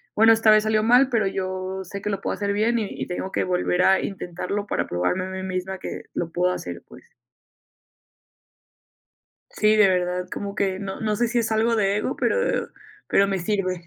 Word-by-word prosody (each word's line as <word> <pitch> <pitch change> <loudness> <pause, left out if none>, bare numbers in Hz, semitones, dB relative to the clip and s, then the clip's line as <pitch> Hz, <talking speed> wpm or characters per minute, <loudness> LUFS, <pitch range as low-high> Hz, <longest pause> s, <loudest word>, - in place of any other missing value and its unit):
"Bueno, 225 +1 +6
esta 225 0 +3
vez 215 0 +6
salió 215 0 +2
mal, 250 +4 +5
pero 225 -5 +1
yo 185 0 -3
sé, 200 +2 -7
que 210 - -3
lo 200 - -3
puedo - - -2
hacer 200 -1 -1
bien, 225 +3 +1
y 210 - -2
y - - -5
tengo 185 +1 -4
que - - +1
volver 180 0 0
a 190 - +5
intentarlo 195 +1 -4
para - - -2
probarme 90 - -1
a - - -6
mí 190 0 -5
misma 190 0 -3
que - - -7
lo 165 -1 -3
puedo 180 +2 +1
hacer, 90 - -6
pues". - - -17 2.4
Sí, 215 0 +3
de 210 -2 +6
verdad, 180 0 0
como 200 -1 -4
que 190 -2 -1
no 195 -1 -5
no 215 -1 0
sé 240 +2 +1
si 240 +1 0
es 225 -1 0
algo 225 +1 +2
de 200 -2 +2
ego, 210 - -2
pero 485 0 0 0.4
pero 200 0 +3
me 195 -1 -1
sirve. 185 -2 -2
195 Hz, 205 wpm, -23 LUFS, 185-215 Hz, 2.4 s, Bueno